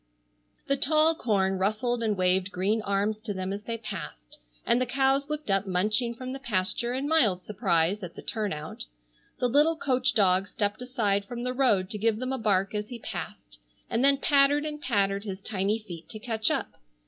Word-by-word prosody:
The 275 - +1
tall 310 +3 +4
corn 195 -9 0
rustled 230 +5 0
and 215 -3 0
waved 185 +1 +2
green 200 +5 0
arms 200 +1 0
to 215 -2 -6
them 185 +1 -3
as 200 - -5
they 230 0 -3
passed, - - -8 0.3
and 245 - +3
the 255 - 0
cows 270 +2 +1
looked 300 -7 -3
up 195 0 +1
munching 215 +6 +1
from 255 +2 -6
the 270 - -6
pasture 235 0 -1
in 265 +3 -2
mild 220 - +3
surprise 190 -2 +1
at 180 -3 -8
the - - -9
turnout. 195 -9 -3 0.5
The 250 - +2
little 295 +6 +3
coach 255 -4 +1
dog 190 -2 +3
stepped 205 +1 -2
aside 215 -6 0
from 240 +2 -6
the 250 0 -1
road 215 -8 +2
to 210 - -4
give 220 0 +2
them 255 +3 -3
a 265 - -2
bark 195 -2 +1
as 210 0 -3
he 245 - -6
passed, - - -7 0.3
and 230 +3 +1
then 275 0 +5
pattered 285 +1 +3
and 300 -1 -5
pattered 200 -6 0
his 195 -3 -5
tiny 200 +1 -1
feet 175 -7 -10
to - - -6
catch 220 -1 0
up. - - -2
215 Hz, 195 wpm, -27 LUFS, 195-255 Hz, 0.5 s, then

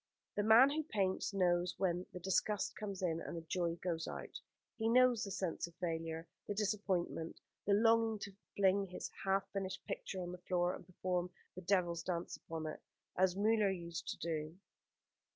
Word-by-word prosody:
The 205 - +2
man 225 +6 +8
who 310 +2 0
paints 200 -12 0
knows 180 -2 +2
when 180 -1 0
the 180 - -6
disgust 190 +2 +1
comes 200 -3 -5
in 165 -2 +1
and 170 - -5
the - - -4
joy 170 0 0
goes 165 -3 -1
out. - - -6 0.4
He 225 0 +1
knows 250 -1 +6
the 200 - -3
sense 185 -3 -2
of 170 - -16
failure, 165 -1 -3 0.2
the 205 - -2
disappointment, 195 -5 -1 0.3
the 200 - +5
longing 225 0 +4
to 200 - -6 0.2
fling 195 0 +4
his 180 - -6
half 195 0 +2
finished 195 -1 -3
picture 190 - -4
on 175 - -4
the 180 - -7
floor 180 0 +1
and - - -9
perform 180 -1 -1 0.2
the 185 - -7
devil's 175 -3 +2
dance 170 0 -2
upon 160 -1 -6
it, 155 - -5 0.3
as 185 0 +3
Müller 210 0 +4
used 170 -3 -5
to - - -3
do." 160 0 -3
185 Hz, 180 wpm, -37 LUFS, 170-205 Hz, 0.4 s, man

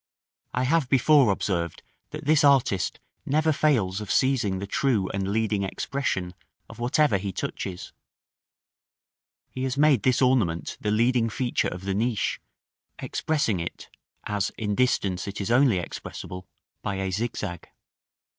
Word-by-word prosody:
I 125 - +1
have 145 0 +2
before 135 -3 +5
observed 85 -4 -2 0.3
that - - -8
this 150 0 +4
artist 135 -10 +3 0.2
never 155 +2 +2
fails 110 -11 +1
of 105 - -7
seizing 125 -8 +2
the 100 - -4
true 105 -2 +1
and 95 -1 -2
leading 110 -1 0
expression 95 -3 -2 0.3
of - - -12
whatever 125 -2 +2
he 100 0 -3
touches: 90 0 -5 1.6
he 130 - -6
has 130 0 -2
made 145 -5 +4
this 130 -2 +2
ornament 110 - +1
the 105 - -1
leading 115 +2 +2
feature 120 +2 0
of 90 +1 -6
the 100 - -1
niche, 110 +1 -1 0.6
expressing 145 - -1
it, 85 - -6 0.3
as 105 -2 -1
in 105 -2 -1
distance 100 -6 0
it 100 - -5
is 100 +3 -2
only 125 -4 +4
expressible, 90 +2 -7 0.3
by 100 - -3
a 95 0 -2
zigzag. 105 -4 -4
110 Hz, 140 wpm, -26 LUFS, 95-130 Hz, 1.6 s, before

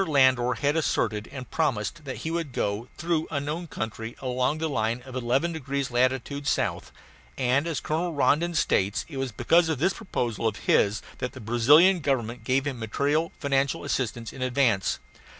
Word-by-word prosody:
Landor 130 -4 +4
had 145 +1 0
asserted 110 -9 0
and 130 -3 -8
promised 150 0 -1
that 130 - -4
he 160 - -1
would 165 -5 -3
go 105 +3 -1
through 165 -1 0
unknown 150 +3 -3
country 110 -3 -5
along 130 +3 0
the 160 +1 -1
line 120 -3 -1
of 130 -1 -9
eleven 130 +7 +1
degrees 140 -3 -3
latitude 130 +3 0
south, - - -1 0.5
and, 130 +5 +2
as 160 -5 -1
Colonel 170 +3 -1
Rondon 160 +3 +2
states, 100 -9 +1
it 145 - -8
was 135 -2 -2
because 165 +9 +3
of 160 - 0
this 180 +8 +2
proposal 120 - -2
of 110 - -1
his 105 +2 +3 0.2
that 125 - -3
the - - -9
Brazilian 145 - +5
Government 125 -5 -1
gave 130 +3 +1
him 135 -4 -3
material 145 +9 0
financial 140 -1 0
assistance 120 -2 -2
in 135 - -9
advance. 125 -5 +2
135 Hz, 170 wpm, -26 LUFS, 120-155 Hz, 0.5 s, Brazilian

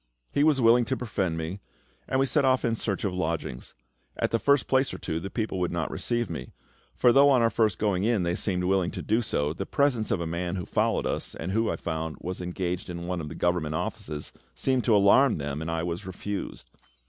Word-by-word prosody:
He 145 - +3
was 150 -3 +4
willing 120 0 +5
to 130 - -1
befriend 100 -9 -2
me, 80 +5 -4 0.5
and 130 - +1
we 135 - +4
set 145 +2 +2
off 130 -1 +3
in 115 -1 +1
search 100 -3 -2
of 95 - -1
lodgings. 80 -7 -3 0.4
At - - 0
the 115 - +2
first 140 +1 +3
place 130 +1 +2
or - - -6
two 80 - -3
the 95 - -6
people 110 -4 -2
would 90 -1 0
not 85 -3 -2
receive 120 -1 -1
me; 75 -7 -7 0.4
for 120 - +5
though 140 +1 +7
on 130 -4 +4
our 115 - +3
first 110 -2 +2
going 100 -3 0
in 110 -4 +2
they 85 0 0
seemed 90 0 -1
willing 95 -1 +2
to - - -6
do 110 +3 +2
so, 75 -9 -1
the 95 +4 -5
presence 130 -6 +1
of - - +1
a 85 - -2
man 85 +2 -2
who 90 - -4
followed - - +1
us, - - -3
and 85 +3 -4
who, 110 +3 +1
I - - 0
found, 80 -1 -4
was 90 +1 -5
engaged 90 0 -3
in 85 -1 -5
one 90 -1 -2
of 75 - -6
the 80 - -8
Government 85 -3 0
offices, 75 -3 -4 0.2
seemed 130 -2 +1
to 115 - +4
alarm 105 +6 +5
them, 70 0 -4
and 80 - -4
I 80 0 -1
was 85 +3 -4
refused. 95 -10 -6
95 Hz, 235 wpm, -27 LUFS, 85-115 Hz, 0.5 s, though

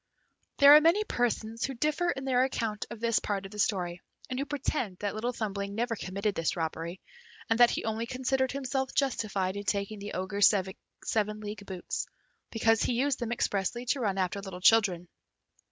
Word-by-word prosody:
There 285 0 +9
are 305 - +8
many 340 +7 +4
persons 230 - -1
who 270 - -4
differ 305 +7 0
in 270 -5 -3
their 255 -1 +3
account 225 -5 -2
of 235 - -8
this 230 0 +2
part 200 -2 -3
of 195 - -9
the 210 - -9
story, 180 -4 0 0.3
and 255 - -2
who 280 - -1
pretend 275 -9 -2
that 205 +1 -3
Little 235 +3 -2
Thumbling 200 -4 -4
never 235 +1 -1
committed 200 +1 -2
this 165 -3 -1
robbery, 165 +2 -4 0.5
and 225 - +3
that 240 -1 +8
he - - -2
only 225 +1 -2
considered 260 +1 0
himself 265 0 -2
justified 205 -8 0
in 205 - -4
taking 200 +1 -1
the 205 +1 -6
Ogre's 200 +2 +3 0.5
seven 215 -1 -1
league 210 -1 -7
boots, 185 -2 -4 0.4
because 225 -1 +2
he - - +1
used 270 +3 +1
them 235 -2 -3
expressly 230 +1 -1
to 270 +3 0
run 200 -5 0
after 190 +1 -1
little 190 -2 -7
children. 185 -3 +4
220 Hz, 185 wpm, -29 LUFS, 200-255 Hz, 0.5 s, There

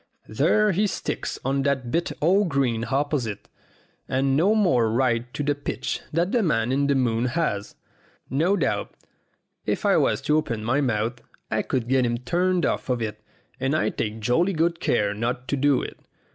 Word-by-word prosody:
There 180 - +3
he 205 +4 +2
sticks - - -3
on 135 +1 +1
that 135 -3 -1
bit 170 +4 0
o' 190 +6 +4
green 130 -8 0
opposite, 135 -6 -1 0.6
and 135 +1 +1
no 190 +9 +3
more 125 - +3
right 120 0 +1
to 145 - -2
the 145 +1 +2
pitch 145 0 -4
than 170 +4 0
the 245 - +2
man 125 - +1
in 140 +1 +1
the 140 - +2
moon 120 -2 +1
has. 120 -7 -2 0.5
No 170 +9 +1
doubt, 155 - -1 0.7
if - - -1
I - - +4
was - - +2
to 150 - +3
open 115 -8 -2
my 125 +6 +1
mouth, 120 -2 -1 0.3
I - - +1
could 125 -3 -2
get 130 0 +3
him 120 0 -1
turned 175 +8 +1
off - - -2
of 125 -1 +1
it, 105 -2 -4 0.4
and 135 +3 0
I - - +1
take 110 0 -4
jolly 165 - +2
good 170 +1 +1
care 105 -3 +1
not 120 +4 -3
to - - +1
do 140 -1 +2
it. - - -7
135 Hz, 185 wpm, -24 LUFS, 120-160 Hz, 0.7 s, o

